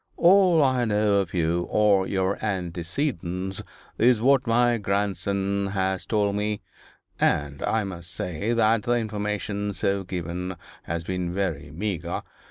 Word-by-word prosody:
'All 180 -3 +6
I 130 -2 +2
know 105 -2 +2
of 95 -4 -2
you 85 0 0
or 100 -3 +3
your 95 +1 -1
antecedents 90 - -2 0.4
is 120 0 +5
what 135 +2 +3
my 120 0 +3
grandson 100 0 -1
has 95 -1 -1
told 105 -2 +1
me 105 0 -1 0.6
and 70 -1 +1
I 110 -1 +1
must 90 -3 -7
say 90 +6 -3
that 115 -1 +3
the 120 +4 0
information 105 -2 -2
so 100 0 0
given 90 0 -4 0.3
has 85 0 -3
been 90 0 -2
very 85 -6 -2
meagre. 90 +3 -3
100 Hz, 135 wpm, -25 LUFS, 90-110 Hz, 0.6 s, All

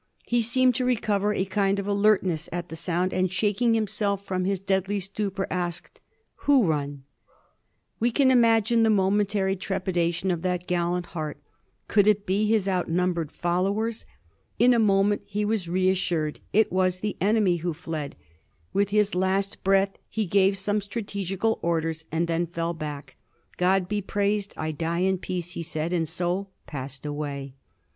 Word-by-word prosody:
He 240 0 +2
seemed 250 +2 +3
to 255 - 0
recover 210 -4 +1
a 190 -2 0
kind 195 0 +1
of 200 - -3
alertness 200 -5 +2
at 175 0 -4
the 160 - -6
sound, 180 +2 -1
and 185 -1 +1
shaking 210 +4 +2
himself 205 -2 -1
from 185 -2 -1
his 195 0 0
deadly 195 +1 0
stupor, 195 0 -2
asked, 175 -2 -4 0.2
" - - -47
Who 280 -4 +6
run 145 -4 -2 0.5
?" - - -47
We 235 - +2
can 260 +2 +3
imagine 230 -2 +4
the 225 - +4
momentary 200 -1 +2
trepidation 185 -1 -1
in 170 -2 -2
that 180 0 -1
gallant 175 0 0
heart: 155 -4 -5 0.5
could 205 -1 +3
it 210 -1 +3
be 200 +3 +1
his 215 -3 +2
outnumbered 180 -3 0
followers? 200 +6 -1 0.5
In 250 +1 +5
a 235 - +3
moment 205 -1 +3
he 210 +1 -1
was 205 -5 -1
reas 185 +1 +2
sured; 160 -5 -1
it 220 +1 +3
was 185 0 +1
the 210 -1 -2
enemy 200 -3 +3
who 170 +1 -2
fled; 155 -3 -5 0.6
with 200 0 +2
his 210 0 +2
last 190 +2 0
breath 195 0 +2
he 220 -1 -1
gave 195 +1 +3
some 205 +2 0
strategical 200 0 -2
orders, 165 -1 -1
and 165 +2 0
then 170 +1 0
fell 170 0 -2
back. 150 -3 -7 0.2
'' - - -33
God 185 0 +3
be 205 +1 -1
praised, 200 +1 -1
I 155 0 -2
die 165 +3 -2
in 190 0 +1
peace," 180 -1 -4
he 180 - -5
said, 165 +1 -3
and 165 -3 0
so 175 +3 -2 0.2
passed 135 0 -7
away. 145 -2 -4
190 Hz, 170 wpm, -26 LUFS, 175-205 Hz, 0.6 s, Who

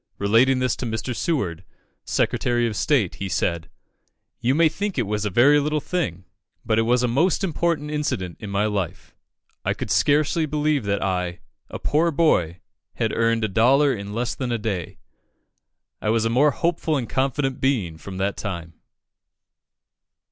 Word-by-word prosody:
Relating 115 +6 +3
this 130 0 0
to - - -7
Mr. 110 +2 -3
Seward, 95 - -1 0.4
Secretary 120 -1 +1
of 115 -2 -2
State, 130 - +1
he 100 - -2
said 85 -2 -1 0.7
"You 130 +3 +1
may 165 +1 +5
think 200 +4 -3
it 125 - +2
was 105 +1 -2
a - - 0
very 135 +9 +5
little 150 +1 0
thing, 135 - -3 0.4
but 110 0 +2
it 115 +1 +1
was 125 0 +3
a - - +3
most 165 +11 +1
important 165 -3 -1
incident 95 - -2
in 105 - -7
my 100 +1 +1
life. 100 -5 -3 0.5
I - - 0
could - - -5
scarcely 155 +2 +2
believe 150 -4 0
that 100 0 0
I, 90 -2 -2 0.3
a - - -5
poor 160 +3 +1
boy, 90 - +1 0.3
had - - -1
earned 115 0 +1
a - - +2
dollar 130 +8 +4
in 100 -3 -6
less 120 +3 -2
than 125 -2 -4
a 120 - +1
day. 100 -6 -4 1.0
I 105 - -1
was 115 0 +2
a 115 - +1
more 140 +5 +4
hopeful 165 0 0
and 120 -4 -3
confident 135 0 -1
being 105 - 0
from 95 +3 -8
that 100 +1 -1
time." 85 -5 -5
120 Hz, 170 wpm, -23 LUFS, 100-145 Hz, 1.0 s, may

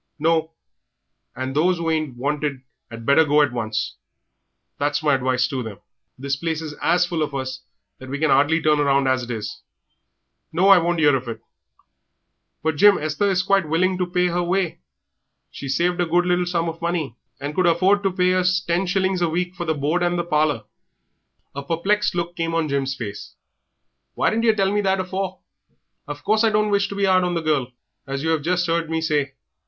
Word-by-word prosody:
"No. 160 +1 +1 0.8
And 130 +1 -4
those 175 +4 +2
who 165 -1 -1
ain't 155 -6 -2
wanted 145 0 -2 0.3
'ad 115 -1 -9
better 140 +5 +5
go 150 0 +4
at 145 - 0
once 110 -3 -3 0.8
that's 145 +1 0
my 150 -2 +3
advice 130 -1 +1
to 130 -2 -3
them. 110 -4 -7 0.4
The 140 +1 -2
place 165 -2 -2
is 155 -2 -6
as 175 +1 +3
full 170 -2 -3
of 150 -2 -2
us 130 -1 -4 0.4
that 130 - -10
we 140 - -3
can 155 0 +1
'ardly 150 +4 +3
turn 150 -1 +3
round 140 -1 +2
as 130 0 +2
it 120 - -8
is. 110 -3 -5 0.9
No, 180 +5 +3
I 195 -2 +8
won't 170 0 0
'ear 145 -3 +5
of 130 -1 -4
it!" 115 -1 -5 1.2
"But, 160 -1 0
Jim, 205 +2 +6
Esther 155 +6 -1
is 185 -2 +1
quite 195 -4 +1
willing 185 +3 +1
to 180 - 0
pay 180 0 +1
her 175 +1 0
way; 175 -1 -1 0.7
she's 135 -1 -3
saved 175 +1 +1
a 175 - 0
good 175 +2 +2
little 180 0 +1
sum 170 -1 -1
of 165 0 -6
money, 170 -7 -2 0.2
and 145 +2 -4
could 185 +2 +2
afford 185 +4 +3
to 195 -1 0
pay 180 0 +2
us 185 0 +2
ten 175 +1 -1
shillings 190 0 0
a 170 - +2
week 180 +2 -2
for 175 -3 -3
board 155 +4 0
and 175 0 +1
the 175 - 0
parlour." 150 -7 0 0.9
A 140 - -5
perplexed 185 +8 0
look 175 0 -3
came 165 -1 -2
on 165 -2 +1
Jim's 135 -1 -1
face. 105 -5 -7 0.8
"Why - - +2
didn't 230 +2 0
yer 220 -1 +4
tell 195 -2 +1
me 205 - +2
that 195 -1 +1
afore? 185 0 -4 0.7
Of 145 0 -7
course 215 +2 +2
I 225 - +4
don't 210 0 +1
wish 200 0 +2
to 200 - -7
be 200 0 +1
'ard 185 -1 +3
on 175 -1 -1
the 165 - -1
girl, 145 -5 0 0.4
as 135 +1 -4
yer 160 0 +1
'ave 160 - 0
just 180 +3 0
heard 165 -1 -1
me 165 0 -1
say. 150 -4 -1
165 Hz, 210 wpm, -22 LUFS, 145-180 Hz, 1.2 s, I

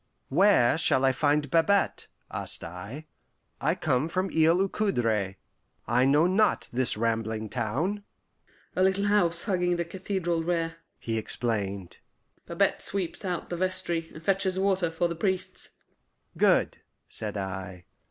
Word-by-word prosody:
"Where 165 -4 +4
shall 135 -5 +3
I 135 - +5
find 145 +1 +1
Babette?" 195 +4 +2 0.2
asked - - -5
I. 100 - -8 0.6
"I - - +2
come 130 +5 0
from 185 +2 -1
Isle 160 +2 +4
aux 195 - +3
Coudres; 115 - 0 0.5
I 125 +3 +3
know 145 +4 +4
not 190 +4 +2
this 125 -3 +1
rambling 110 -1 -1
town." 140 - -2 0.7
"A - - +1
little 190 +2 +3
house 175 -5 +2
hugging 180 -4 +1
the 170 0 -2
cathedral 175 -2 -2
rear," 165 -1 -1 0.2
he 115 -1 -2
explained. 100 -5 -2 0.5
"Babette - - +1
sweeps 195 0 -3
out 180 -3 -3
the 175 - -2
vestry, 180 -2 -2
and 160 - -11
fetches 190 0 +1
water 190 -2 +1
for 165 +2 0
the 170 - -3
priests." 185 +2 -3 0.7
"Good," - - +3 0.3
said 105 -1 -3
I. 95 -2 -5
165 Hz, 140 wpm, -27 LUFS, 115-185 Hz, 0.7 s, I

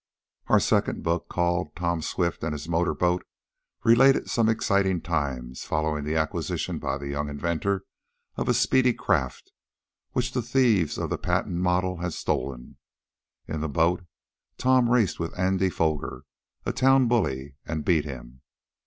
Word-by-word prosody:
Our - - +5
second - - +1
book, 85 +1 -1
called 85 -3 -1
"Tom 85 -2 -1
Swift 85 +1 -2
and 80 -1 -1
His 75 +1 -6
Motor 85 +1 +1
Boat," 90 0 +1 0.6
related 130 +4 +5
some 115 -2 +3
exciting 100 -5 +2
times 70 -7 -3
following 75 -1 -1
the 75 +1 -1
acquisition 80 -1 -2
by 65 - -2
the 70 0 -6
young 75 +1 -2
inventor 85 +6 -1 0.5
of - - -2
a - - +3
speedy 125 -2 +3
craft 75 - -1 0.6
which 125 0 0
the 125 - -1
thieves 115 - +2
of - - -3
the - - -1
patent 85 - -1
model 90 0 +1
had 90 -1 -3
stolen. 65 -5 -3 0.7
In 80 - -3
the 80 - -2
boat 85 +5 +1 0.5
Tom 130 -2 +3
raced 120 -6 +2
with 85 +1 -4
Andy 95 +1 +2
Foger, 80 -4 -2 0.4
a - - -1
town 135 0 +4
bully, 70 - -1
and 80 -2 -3
beat 80 -5 +3
him. 65 -3 -9
85 Hz, 155 wpm, -26 LUFS, 75-100 Hz, 0.7 s, Our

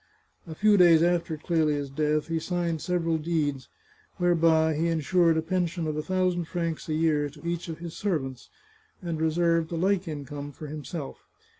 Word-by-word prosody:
A 160 - -7
few 210 +3 +4
days 170 -3 +6
after 170 -2 +1
Clelia's 150 -3 0
death 150 +1 0
he 165 0 -1
signed 170 -1 -2
several 165 -3 0
deeds, 150 -4 -1 0.5
whereby 165 -3 +3
he 160 +3 0
insured 165 +1 +2
a 160 - 0
pension 175 0 -1
of 155 -1 -2
a 155 - -1
thousand 185 0 0
francs 165 -1 -3
a 155 - 0
year 155 -2 +1
to 145 +2 -15
each 170 0 -3
of 160 - -5
his 170 -1 -8
servants, 135 -11 -3 0.5
and 165 -3 -3
reserved 165 0 +1
a - - -2
like 190 +2 +1
income 145 -1 -6
for 155 - -9
himself. 150 0 -6
165 Hz, 170 wpm, -27 LUFS, 155-175 Hz, 0.5 s, days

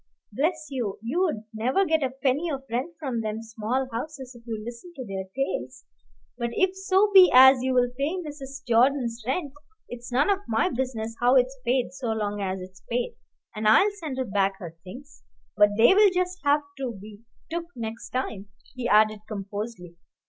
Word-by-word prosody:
Bless 305 - 0
you, 235 -7 -3
you'd 305 - 0
never 255 - +1
get 320 -2 +1
a 265 - +1
penny 270 +5 -1
of 275 -3 -4
rent 260 +8 -2
from 265 -7 -3
them 220 +1 -4
small 225 +4 -2
houses 265 +1 -6
if 240 0 -17
you 225 -2 -3
listened 240 +10 -9
to 260 -3 -6
their 195 -2 -5
tales. 270 0 -3 0.5
But 235 0 -1
if 375 +5 +2
so 385 +2 +2
be 375 -2 +9
as 260 0 +8
you'll 250 -1 +2
pay 290 +7 -1
Mrs. 275 -5 -8
Jordan's 240 -1 +2
rent, 280 +1 -2 0.3
it's 245 0 -9
none 280 +11 +3
of 395 - +1
my 225 +10 +1
business 240 -4 -3
how 245 +2 +4
it's 255 +1 +3
paid, 250 +1 0
so 270 -3 -5
long 205 -1 -2
as 190 -1 -2
it's 185 0 -12
paid, 240 +1 -1 0.4
and 215 0 -1
I'll 375 - +6
send 315 -10 -6
her 260 - -1
back 195 -2 0
her 170 -4 -9
things. 260 +10 -12 0.3
But 205 -1 +6
they'll 390 - +6
just 365 0 -2
have 290 0 +3 0.2
to 255 -3 -3
be 210 +1 -12 0.3
took 340 0 -2
next 225 -1 -6
time," 220 -6 -4 0.3
he 250 -2 -3
added 215 0 +4
composedly. 200 -3 -6
250 Hz, 180 wpm, -26 LUFS, 220-285 Hz, 0.5 s, be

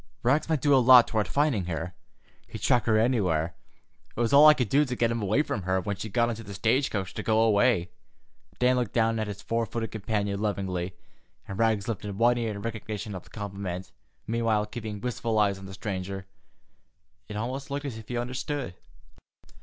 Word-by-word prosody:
"Rags 145 +6 +2
might 155 -4 +1
do 145 - +4
a - - +7
lot 125 -1 +8
toward 110 -2 0
finding 140 - +1
her. 85 +1 -4 0.5
He'd - - -8
track 120 -3 +3
her 110 -2 +3
anywhere. 90 -9 +1 0.6
It - - -7
was 120 +3 +1
all 145 +2 +9
I 150 - +8
could 125 -6 0
do 140 +8 +4
to 125 -3 -3
get 115 -1 +1
him 115 -1 -2
away 105 +9 +2
from 105 - -3
her 95 +1 0
when 100 +2 -3
she 105 +3 -6
got 120 +2 +2
into 115 -1 -4
the 100 -2 -9
stage 115 +7 +2
coach 95 -4 -3
to - - -4
go 110 0 +2
away." 105 -4 +3 0.7
Dan 125 0 +3
looked 120 -5 -1
down 115 -1 +2
at 110 - -2
his 100 -1 -7
four 115 0 -1
footed 115 0 -4
companion 100 -2 -2
lovingly, 95 -3 -2 0.5
and 95 - -6
Rags 110 -3 +2
lifted 105 -3 -4
one 120 +2 +3
ear 115 -1 -1
in 100 -1 -6
recognition 110 -2 -5
of 90 - -7
the - - -18
compliment, 100 -3 -6 0.3
meanwhile 115 -2 +1
keeping 105 -1 -6
wistful 115 -2 -2
eyes 100 -2 +2
on 95 - -9
the 95 - -9
stranger. 95 -1 -5 1.0
It 105 - -7
almost 130 +5 -4
looked 140 +1 -3
as 120 -5 -5
if 110 - -12
he 120 - -3
understood. 125 0 -3
110 Hz, 205 wpm, -27 LUFS, 100-120 Hz, 1.0 s, all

